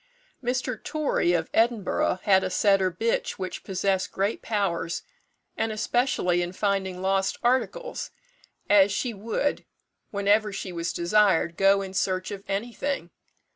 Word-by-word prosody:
Mr. 250 +1 -2
Torry, 295 - 0
of 160 -2 0
Edinburgh, 225 -5 +1
had 190 -2 +4
a 185 - -1
setter 195 0 +3
bitch 225 +7 -1
which 185 -1 -6
possessed 190 -1 -1
great 200 +3 -1
powers, 190 -6 -1 0.5
and 225 - -1
especially 215 -5 +1
in 175 +1 -3
finding 190 -2 -1
lost 190 0 +1
articles, - - 0 0.6
as 205 -1 +5
she 240 +4 -1
would, 225 +7 -2 0.5
whenever 205 +1 +2
she 195 -1 -5
was 170 -1 -2
desired, 175 -2 +2
go 195 +1 +4
in 190 -1 -7
search 185 0 -1
of 200 -1 -6
anything. 220 0 -3
195 Hz, 135 wpm, -26 LUFS, 185-220 Hz, 0.6 s, as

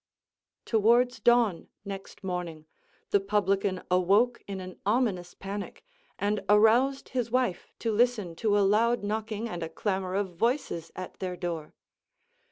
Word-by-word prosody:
Towards 235 +3 +3
dawn, 230 -5 +3 0.2
next 195 0 -8
morning, 175 -4 -4 0.5
the 200 - +5
publican 195 -1 0
awoke 200 +7 +3
in 195 -1 -5
an 185 -1 -9
ominous 205 -5 0
panic, 200 - -7 0.3
and 205 0 -1
aroused 230 +6 +4
his 245 -3 -2
wife 245 -6 0
to 230 - -1
listen 215 -6 +1
to 210 0 +2
a 200 - +4
loud 225 +3 +3
knocking, 215 +1 -2
and 175 -6 -5
a 165 - -3
clamor 190 +1 -2
of 195 -2 -1
voices 230 - -1
at 185 - -8
their 180 -1 -4
door. 170 -4 -5
205 Hz, 140 wpm, -28 LUFS, 185-230 Hz, 0.5 s, the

